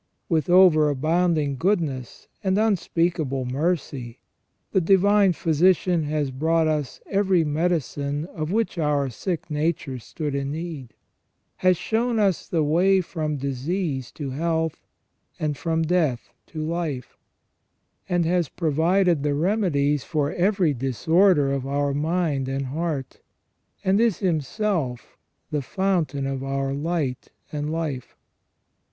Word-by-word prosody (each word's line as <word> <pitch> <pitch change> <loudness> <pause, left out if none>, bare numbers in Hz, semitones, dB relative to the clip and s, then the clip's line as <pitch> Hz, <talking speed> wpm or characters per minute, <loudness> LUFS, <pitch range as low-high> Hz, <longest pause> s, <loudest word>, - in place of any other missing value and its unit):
With 165 0 0
over 175 -4 +6
abounding 155 0 +1
goodness 155 - -1 0.2
and 190 0 +1
unspeakable 165 - 0
mercy, 135 -3 -2 0.5
the 190 - +3
Divine 195 +2 +4
Physician 170 0 +2
has 145 -2 -1
brought 160 +5 +1
us 150 -4 -2
every 190 -4 +2
medicine 150 -2 -1
of 160 -2 -5
which 220 -4 0
our 145 -3 +1
sick 165 - -4
nature 150 -3 -1
stood 150 +5 -5
in 140 0 -2
need; 155 -6 -6 0.6
has 185 -1 +3
shown 230 +4 0
us 200 -5 +1
the 165 -3 +1
way 180 +6 +3
from 155 -4 -3
disease 140 +1 -2
to 140 -4 -5
health, 160 +2 -2 0.5
and 150 -1 -1
from 165 +2 -1
death 160 -7 0 0.2
to 155 -2 -5
life; 160 -6 -3 0.9
and 175 -1 +2
has 170 -3 +1
provided 170 +1 +2
the 145 0 0
remedies 150 - +1
for 150 -3 -1
every 185 -4 +2
disorder 145 - +3
of 135 -1 -3
our 140 0 0
mind 150 -3 0
and 135 0 -2
heart, 145 -1 -4 0.6
and 195 +3 +3
is 230 -5 +2
Himself 160 - -2 0.4
the 150 -1 0
fountain 160 -4 -1
of 135 -1 -3
our 135 0 -2
light 145 -3 -2 0.2
and 150 0 -3
life. 155 -6 -4
155 Hz, 125 wpm, -24 LUFS, 140-180 Hz, 0.9 s, over